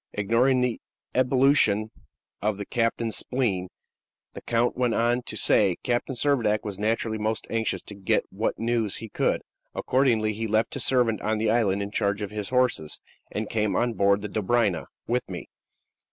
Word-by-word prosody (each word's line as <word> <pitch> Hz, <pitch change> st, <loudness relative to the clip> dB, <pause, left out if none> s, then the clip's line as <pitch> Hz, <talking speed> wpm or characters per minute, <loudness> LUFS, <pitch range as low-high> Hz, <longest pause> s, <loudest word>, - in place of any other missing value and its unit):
Ignoring 115 Hz, +6 st, +2 dB
this 125 Hz, -2 st, 0 dB, 0.4 s
ebullition 125 Hz, -5 st, +3 dB, 0.5 s
of 105 Hz, -1 st, 0 dB
the 100 Hz, -, -5 dB
captain's 115 Hz, 0 st, 0 dB
spleen, 105 Hz, -8 st, -1 dB, 0.7 s
the -, -, -8 dB
count 120 Hz, +1 st, +1 dB
went 125 Hz, -2 st, +1 dB
on 120 Hz, +2 st, +2 dB
to 110 Hz, -, -4 dB
say: 100 Hz, -4 st, +3 dB
"Captain 125 Hz, +2 st, -1 dB
Servadac 120 Hz, -6 st, +1 dB
was 100 Hz, -2 st, -5 dB
naturally 110 Hz, +1 st, -1 dB
most 110 Hz, 0 st, -1 dB
anxious 115 Hz, -1 st, -1 dB
to -, -, -10 dB
get 100 Hz, -2 st, 0 dB
what 105 Hz, +4 st, -1 dB
news 115 Hz, -3 st, 0 dB
he 115 Hz, -, -7 dB
could. -, -, 0 dB, 0.3 s
Accordingly, 115 Hz, -5 st, +2 dB
he 110 Hz, +2 st, -3 dB
left 110 Hz, +1 st, +1 dB
his -, -, 0 dB
servant 120 Hz, -4 st, +2 dB
on 110 Hz, +1 st, 0 dB
the 110 Hz, 0 st, +1 dB
island 100 Hz, -4 st, +2 dB
in 100 Hz, -, -6 dB
charge 100 Hz, 0 st, 0 dB
of 100 Hz, -, -5 dB
his 105 Hz, -2 st, -2 dB
horses, 125 Hz, -12 st, +1 dB, 0.3 s
and 110 Hz, 0 st, -3 dB
came 105 Hz, -3 st, 0 dB
on 120 Hz, +2 st, +1 dB
board 100 Hz, 0 st, +2 dB
the -, -, -2 dB
Dobryna 105 Hz, -3 st, 0 dB, 0.2 s
with 125 Hz, +1 st, -1 dB
me. -, -, -7 dB
110 Hz, 170 wpm, -26 LUFS, 105-120 Hz, 0.7 s, ebullition